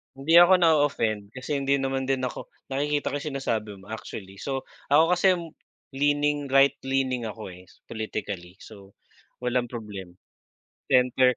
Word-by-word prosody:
Hindi 160 Hz, +5 st, +4 dB
ako 175 Hz, +2 st, +8 dB
na-o-offend 115 Hz, -10 st, +2 dB
kasi 135 Hz, +3 st, -3 dB
hindi 140 Hz, 0 st, +1 dB
naman 135 Hz, 0 st, -1 dB
din 135 Hz, -1 st, 0 dB
ako, 130 Hz, -, -4 dB, 0.2 s
nakikita 145 Hz, +2 st, -1 dB
ko 145 Hz, -, -2 dB
sinasabi 135 Hz, -8 st, -3 dB
mo, 100 Hz, -, -16 dB
actually. 100 Hz, -3 st, -8 dB
So, 135 Hz, +2 st, -3 dB, 0.3 s
ako 155 Hz, +2 st, +7 dB
kasi, 190 Hz, +1 st, +5 dB, 0.6 s
leaning 145 Hz, +1 st, +1 dB
right 135 Hz, 0 st, +5 dB
leaning 130 Hz, -3 st, 0 dB
ako, 110 Hz, -2 st, -6 dB
eh, 90 Hz, 0 st, -13 dB, 0.2 s
politically. 100 Hz, -5 st, -5 dB
So, 100 Hz, -2 st, -14 dB, 0.5 s
walang 125 Hz, 0 st, 0 dB
problema. 100 Hz, -6 st, -7 dB, 0.7 s
Center. 125 Hz, 0 st, +4 dB
130 Hz, 135 wpm, -26 LUFS, 110-140 Hz, 0.7 s, ako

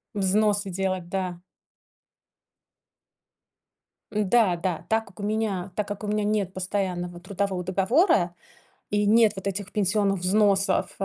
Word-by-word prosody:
Взносы 205 Hz, +1 st, +2 dB
делать, 185 Hz, -1 st, -2 dB
да. 180 Hz, -2 st, -3 dB, 2.7 s
Да-да, 190 Hz, -5 st, +1 dB
так 220 Hz, 0 st, +1 dB
как 200 Hz, +1 st, -17 dB
у -, -, -5 dB
меня, 205 Hz, -4 st, -1 dB
так 210 Hz, -1 st, -2 dB
как 205 Hz, +1 st, -6 dB
у -, -, -3 dB
меня 210 Hz, 0 st, 0 dB
нет 205 Hz, -3 st, 0 dB
постоянного 180 Hz, -2 st, -3 dB
трудового 190 Hz, 0 st, -3 dB
договора, 190 Hz, -, +2 dB, 0.6 s
и 205 Hz, 0 st, +1 dB
нет 220 Hz, 0 st, +5 dB
вот 190 Hz, -, -7 dB
этих 200 Hz, 0 st, -3 dB
пенсионных 200 Hz, -1 st, +1 dB
взносов, 195 Hz, 0 st, +2 dB
э, -, -, +1 dB
195 Hz, 125 wpm, -25 LUFS, 185-210 Hz, 2.7 s, нет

